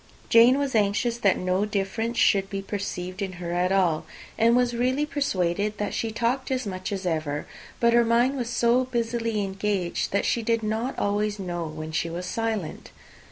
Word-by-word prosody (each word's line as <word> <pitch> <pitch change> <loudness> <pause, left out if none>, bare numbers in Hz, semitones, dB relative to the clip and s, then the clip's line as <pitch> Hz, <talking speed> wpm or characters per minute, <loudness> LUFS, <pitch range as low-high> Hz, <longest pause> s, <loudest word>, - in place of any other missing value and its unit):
Jane 235 +3 +7
was 280 -2 -1
anxious 215 +2 +1
that 200 -4 +3
no 185 +2 0
difference 210 +3 -2
should 195 -3 +3
be 195 -1 -4
perceived 190 -2 -4
in 190 -2 -3
her 175 -1 -5
at 180 +1 +1
all, 180 -5 +2 0.3
and 230 +1 +4
was 245 -1 +2
really 255 +5 +1
persuaded 210 - -1
that 205 - -2
she 225 - -1
talked 240 +4 -1
as 255 -2 -1
much 185 -1 -4
as 195 -1 -3
ever; 155 -4 -2 0.3
but 235 0 +4
her 235 0 +5
mind 235 +4 +2
was 245 -3 -3
so 240 +1 +2
busily 230 -3 -1
engaged, 195 -2 -2
that 200 - +1
she 235 - +1
did 230 0 0
not 220 +5 -2
always 205 +1 0
know 175 -4 -4
when 155 0 -7
she 165 +1 -1
was 175 +2 -5
silent. 220 -4 -3
210 Hz, 185 wpm, -25 LUFS, 185-235 Hz, 0.3 s, Jane